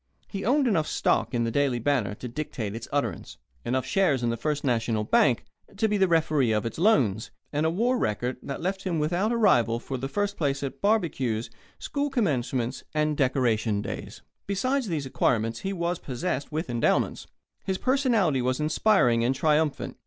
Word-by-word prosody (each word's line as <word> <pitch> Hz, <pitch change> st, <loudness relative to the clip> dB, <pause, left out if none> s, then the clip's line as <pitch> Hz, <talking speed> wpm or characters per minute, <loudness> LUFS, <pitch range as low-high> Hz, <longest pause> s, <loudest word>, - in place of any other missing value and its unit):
He 195 Hz, -2 st, -5 dB
owned 270 Hz, +4 st, +3 dB
enough 165 Hz, -9 st, +1 dB
stock -, -, +1 dB
in 120 Hz, -2 st, 0 dB
the 115 Hz, -, -1 dB
Daily 140 Hz, -1 st, +1 dB
Banner 120 Hz, -5 st, 0 dB
to 125 Hz, -, -7 dB
dictate 120 Hz, -5 st, -4 dB
its 115 Hz, 0 st, -6 dB
utterance, 145 Hz, 0 st, -2 dB, 0.3 s
enough 130 Hz, +2 st, -1 dB
shares 155 Hz, -10 st, +2 dB
in 120 Hz, -, +1 dB
the -, -, -1 dB
First 145 Hz, +5 st, -2 dB
National 115 Hz, -4 st, 0 dB
Bank 120 Hz, +2 st, +3 dB, 0.3 s
to 220 Hz, -, +2 dB
be 210 Hz, -, 0 dB
the 195 Hz, -2 st, +3 dB
referee 155 Hz, -7 st, +2 dB
of 105 Hz, +1 st, 0 dB
its 115 Hz, -, -4 dB
loans, 125 Hz, -, +2 dB, 0.2 s
and 150 Hz, +2 st, +1 dB
a -, -, +2 dB
war 235 Hz, +9 st, +1 dB
record 120 Hz, +4 st, -1 dB
that 140 Hz, -, -6 dB
left 190 Hz, +2 st, -2 dB
him 180 Hz, -4 st, -2 dB
without 175 Hz, +8 st, 0 dB
a 235 Hz, -, +1 dB
rival 120 Hz, -, +3 dB
for 130 Hz, +2 st, -5 dB
first 200 Hz, +10 st, -2 dB
place 140 Hz, -3 st, -1 dB
at 135 Hz, -, -5 dB
barbecues, 140 Hz, -, 0 dB, 0.3 s
school 290 Hz, 0 st, -2 dB
commencements, 130 Hz, -, -1 dB
and 150 Hz, 0 st, +1 dB
Decoration 120 Hz, -6 st, +1 dB
Days. -, -, -7 dB, 0.2 s
Besides 255 Hz, +6 st, 0 dB
these 155 Hz, -6 st, -2 dB
acquirements 115 Hz, -3 st, 0 dB
he 195 Hz, -, -3 dB
was 175 Hz, -2 st, -2 dB
possessed 130 Hz, +2 st, -3 dB
with 155 Hz, +2 st, -2 dB
endowments. 120 Hz, -2 st, 0 dB, 0.4 s
His 190 Hz, -1 st, -1 dB
personality 235 Hz, -, +2 dB
was 130 Hz, +2 st, 0 dB
inspiring 150 Hz, -, +3 dB
and 130 Hz, +3 st, +1 dB
triumphant. 150 Hz, -1 st, 0 dB
145 Hz, 180 wpm, -26 LUFS, 120-190 Hz, 0.4 s, owned